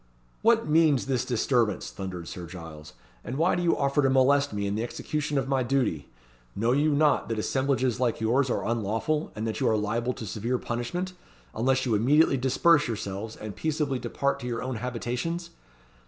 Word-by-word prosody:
"What 230 -3 +3
means 150 -3 +4
this 130 -3 0
disturbance?" 120 -4 0
thundered 90 -3 -6
Sir 90 -2 -7
Giles; 80 -3 -10 0.3
"and 125 - -5
why 165 +4 +3
do 175 - 0
you 170 -1 +2
offer 140 +1 +2
to 135 - +3
molest 140 +2 +3
me 100 -1 -2
in 100 - -1
the 110 - -1
execution 145 +4 -3
of 135 -1 0
my 135 -1 +1
duty? 120 - 0 0.5
Know 115 +4 +1
you 145 +4 +3
not 150 -3 +2
that 115 - -1
assemblages 130 +1 0
like 125 -3 0
yours 125 +4 +2
are - - -1
unlawful, 115 +7 -1
and 110 - -3
that 110 - -3
you - - +2
are 110 - +2
liable 115 +4 -1
to 115 - -7
severe 115 +6 -2
punishment, 150 +12 -3 0.4
unless 130 +3 +1
you 120 - +1
immediately 135 +8 +4
disperse 145 +4 +3
yourselves, 110 -1 -4
and 105 -2 -7
peaceably 150 -4 -1
depart 140 +2 -1
to 125 - -6
your 120 -1 -3
own 130 -2 -3
habitations? 125 +8 -3
125 Hz, 185 wpm, -27 LUFS, 110-140 Hz, 0.5 s, means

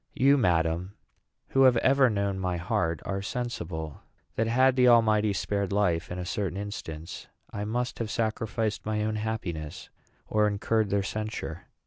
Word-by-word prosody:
You, 140 +2 +5
madam, 90 -4 +1 0.5
who 135 - +2
have 125 -2 +6
ever 135 +2 +4
known 100 -2 -1
my 90 -2 -1
heart, 85 -1 -1
are 100 0 -2
sensible 90 - -4 0.3
that, 115 - +1
had 130 +3 +4
the 125 -1 +5
Almighty 110 -3 +5
spared 100 0 -1
life 90 -5 +1
in 90 - -4
a 90 - -4
certain 95 0 -2
instance, 85 -6 -6 0.2
I 105 0 -4
must 120 +3 -2
have 115 -2 -2
sacrificed 110 -1 -1
my 105 0 -1
own 110 0 -1
happiness 95 -7 -4 0.3
or 105 0 +2
incurred 105 +1 0
their 100 0 +1
censure. 105 -5 -5
105 Hz, 155 wpm, -28 LUFS, 90-115 Hz, 0.5 s, have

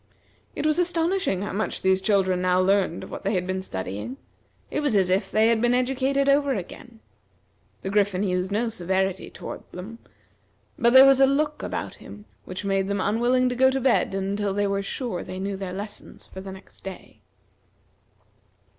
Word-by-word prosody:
It - - -3
was 310 +2 +2
astonishing 345 - +1
how 205 - -4
much 215 +3 -2
these 190 0 +3
children 190 -3 +2
now 180 0 +2
learned 190 -2 +2
of - - -10
what - - -7
they 200 +1 0
had 180 -1 0
been 185 0 -2
studying. 100 - -5 0.5
It - - -1
was 290 -7 +1
as 190 -2 +3
if 190 +2 +1
they 220 +1 +3
had 230 -1 +2
been 240 +1 +3
educated 270 +2 +1
over 280 -1 +3
again. 225 +4 -8 0.8
The 190 - -3
Griffin 200 -2 +2
used 185 -1 -1
no 220 +4 0
severity 190 -2 -1
toward - - -8
them, 210 +6 -8 0.8
but 235 +1 +3
there 260 +1 +10
was 270 0 +5
a 270 - +7
look 300 +2 0
about - - -4
him 210 0 -11 0.2
which 185 +2 -6
made 195 -1 +1
them 200 0 -1
unwilling 240 +6 +2
to 250 - -3
go 260 +1 +5
to 265 0 -1
bed 255 -6 +2
until 195 +1 -1
they 205 0 +1
were 200 0 0
sure 200 -2 -4
they 185 - -7
knew 195 +1 -3
their 190 -1 -5
lessons 205 +3 -9
for 190 - -10
the 190 0 -8
next 190 0 -14
day. 190 -1 -10
205 Hz, 190 wpm, -25 LUFS, 190-255 Hz, 0.8 s, there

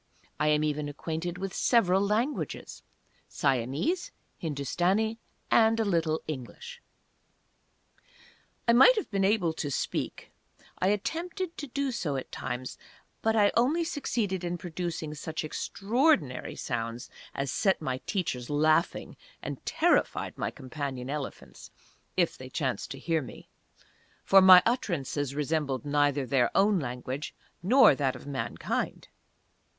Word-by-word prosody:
I 150 - +2
am 150 0 +3
even 150 -1 -1
acquainted 165 +4 -4
with 195 +1 -4
several 195 -6 +3
languages; 220 +8 -2 0.5
Siamese, 140 - 0 0.3
Hindustani, 180 - 0 0.3
and 225 0 +5
a 225 - +2
little 165 -5 0
English. 315 - -7 1.9
I 235 - +6
might 265 - +8
have 425 - -3
been 195 -1 +1
able 190 -5 +2
to 150 -2 -3
speak; 140 - -3 0.5
I 185 - +2
attempted 335 - -2
to 290 - -5
do 275 +1 -2
so 160 - -2
at 135 - -5
times; 125 0 -5 0.4
but 225 0 +2
I 205 -2 +4
only 280 +9 +3
succeeded 215 - -2
in 175 0 -2
producing 170 -3 -4
such 160 +2 -5
extraordinary 200 - 0
sounds 115 +1 -4 0.3
as 140 -1 -2
set 195 -2 +2
my 130 -4 -3
teachers 145 - -2
laughing, 155 +2 +1 0.3
and - - -6
terrified - - +1
my - - -2
companion 135 -1 -5
elephants, 145 -2 -7 0.5
if - - +2
they - - -8
chanced - - -2
to - - -6
hear 165 -2 0
me; 130 - -11 0.7
for 195 0 +7
my 185 -1 +9
utterances 145 - -1
resembled 145 -3 -1
neither 145 -1 +2
their 125 -1 +2
own 200 0 +4
language 130 +1 -5 0.3
nor 245 - +6
that 135 -1 0
of 130 - -11
mankind! 140 -2 -3
165 Hz, 130 wpm, -29 LUFS, 140-215 Hz, 1.9 s, my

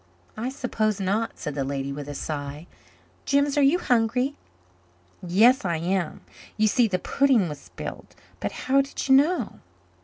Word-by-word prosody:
"I 230 +4 -3
suppose 220 -6 -1
not," 200 +4 -1
said 150 - -5
the 140 -1 -2
lady 135 0 -3
with 145 0 -7
a 145 - -6
sigh. 145 +1 -5 0.6
"Jims, 280 0 +2
are 290 - +3
you 280 +5 +5
hungry?" 250 -1 +1 0.9
"Yes, 215 +9 +4
I 170 -3 0
am. 175 0 -2 0.4
You 215 0 +3
see, 240 +2 +3
the 185 -3 0
pudding 255 0 +2
was 150 -2 -6
spilled. - - -9 0.2
But - - -3
how 275 +1 +4
did 275 0 -5
you 265 - +5
know?" 280 - +2
215 Hz, 160 wpm, -25 LUFS, 165-265 Hz, 0.9 s, you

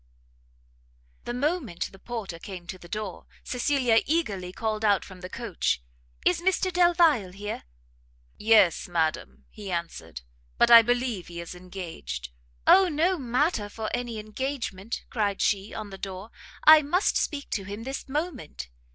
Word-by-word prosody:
The 240 - -3
moment 280 - -1
the 195 - -15
porter 205 -7 -6
came 180 -1 -8
to 185 +1 -7
the 175 - -13
door, 210 -2 -5 0.2
Cecilia 250 -2 +2
eagerly 210 - -1
called 215 +1 -2
out 205 -2 +3
from 185 -2 -12
the 180 - -7
coach, 190 - -1 0.4
"Is 180 - +3
Mr 375 0 +1
Delvile 335 - +4
here?" 205 +2 -6 0.7
"Yes, 210 -5 +4
madam," 155 - -1
he 205 -2 -8
answered, 165 - -5 0.4
"but - - +4
I 230 -1 +12
believe 240 -5 -1
he 170 -1 -8
is 170 +1 -7
engaged." 180 - -7 0.4
"Oh 385 -1 +7
no 335 +4 +1
matter 250 -3 0
for 220 +1 -5
any 240 -2 -4
engagement!" 215 -2 -4
cried 205 -4 0
she, 200 0 +1
"on 215 -2 -6
the 195 - -9
door, 195 +3 -6 0.3
I 310 0 +9
must 350 +7 +1
speak 280 -2 -1
to 200 - -1
him 205 +3 -6
this 270 +2 -5
moment!" 265 - -4
215 Hz, 150 wpm, -27 LUFS, 185-265 Hz, 0.7 s, I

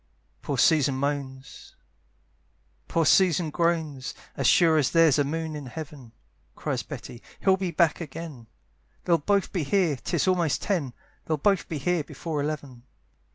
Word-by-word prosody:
Poor 140 - -3
Susan 140 -1 +4
moans, 135 -1 -5 1.1
poor 165 -1 +1
Susan 175 -2 +3
groans, 160 -6 -1 0.2
"As - - 0
sure 165 -3 +5
as 140 - +2
there's 165 -4 +4
a - - +4
moon 160 +2 -3
in 145 -3 -7
heaven," 140 -3 -9 0.4
Cries - - -2
Betty, 120 - -9 0.2
"he'll 190 -1 +4
be 190 -1 -3
back 170 0 +2
again; 155 -6 -8 0.6
"They'll 170 -2 +3
both 200 +5 +1
be 180 - 0
here, 160 -1 +1
'tis 125 - -1
almost 175 -7 +1
ten, 165 -11 -1 0.3
"They'll 155 - 0
both 195 +5 +1
be 160 - -3
here 170 +3 0
before 150 +1 -4
eleven." 140 -4 -5
155 Hz, 150 wpm, -26 LUFS, 140-170 Hz, 1.1 s, sure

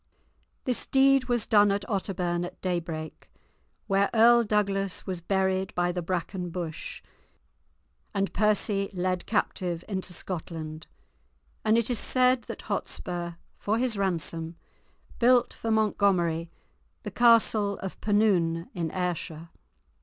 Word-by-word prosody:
This 250 -2 -1
deed 270 -1 +4
was 240 -3 +1
done 205 -1 +5
at 200 0 -2
Otterbourne 180 -4 -1
at 175 - -7
daybreak, 170 -3 -4 0.6
where 195 -1 +2
Earl 235 +1 +6
Douglas 200 -3 0
was 185 -2 -4
buried 190 +1 0
by 175 0 +1
the 180 0 -3
bracken 180 +1 -3
bush, 170 -2 -6 1.1
and 195 -1 -1
Percy 210 -2 +1
led 185 0 -1
captive 180 -5 -1
into 190 -3 -4
Scotland, 160 -3 -6 0.8
and 220 +1 +3
it 235 +1 +1
is 235 - +1
said 255 -1 +2
that - - -7
Hotspur, 175 -2 -4 0.3
for 215 +2 0
his 245 -2 0
ransom, 165 -4 -2 0.6
built 245 0 +4
for 225 - -5
Montgomery 190 -6 +2 0.5
the - - -5
castle 225 -4 +4
of 190 - -6
Penoon, 185 -6 +2
in 170 -2 -2
Ayrshire. 170 -2 -3
190 Hz, 125 wpm, -27 LUFS, 175-215 Hz, 1.1 s, Earl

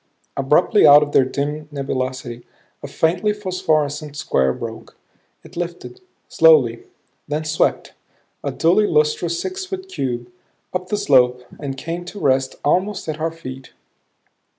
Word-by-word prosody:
Abruptly 150 - +4
out 145 +1 +9
of 145 - -5
their 135 - +4
dim 150 +3 -3
nebulosity 130 -3 -4 0.4
a - - -6
faintly 180 +6 +1
phosphorescent 155 -7 -1
square 65 - +1
broke. - - -8 0.5
It - - -15
lifted, 175 - -6 0.3
slowly; 470 -6 +4 0.4
then 150 +1 -2
swept, 155 +1 0 0.5
a - - -2
dully 185 +6 +3
lustrous 155 +2 +1
six 380 0 -4
foot 380 0 -6
cube, 125 - -4 0.4
up 180 0 -3
the 210 - -1
slope 125 -9 +3 0.2
and 135 -2 -5
came 165 +5 -5
to 200 +4 -8
rest 130 -3 +1
almost 185 +6 0
at 155 -1 -4
our 160 +1 0
feet. 135 -5 -10
155 Hz, 135 wpm, -20 LUFS, 135-185 Hz, 0.5 s, out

